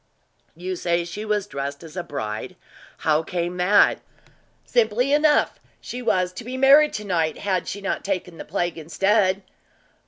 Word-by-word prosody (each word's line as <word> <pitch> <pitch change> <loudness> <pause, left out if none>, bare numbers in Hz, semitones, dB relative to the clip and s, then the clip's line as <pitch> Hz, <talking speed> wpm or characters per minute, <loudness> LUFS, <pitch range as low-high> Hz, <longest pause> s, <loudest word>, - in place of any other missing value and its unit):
"You 185 +2 -4
say 170 -1 0
she 205 +5 -6
was 210 -2 0
dressed 140 -4 -5
as 160 0 -11
a 180 - -2
bride 110 -10 -5 0.5
how 155 -1 +3
came 175 +1 -3
that?" 195 +3 +4 0.7
"Simply 240 +3 +2
enough. 300 0 +3 0.2
She 245 +2 -7
was 185 -6 +1
to 235 - -7
be 250 +3 -5
married 280 +3 +6
to 210 - -4
night, 165 -5 0
had 190 -3 -1
she 200 - -5
not 200 - -2
taken 180 -3 -3
the - - -5
plague 175 -1 -2
instead." 195 +4 +1
185 Hz, 160 wpm, -23 LUFS, 170-210 Hz, 0.7 s, married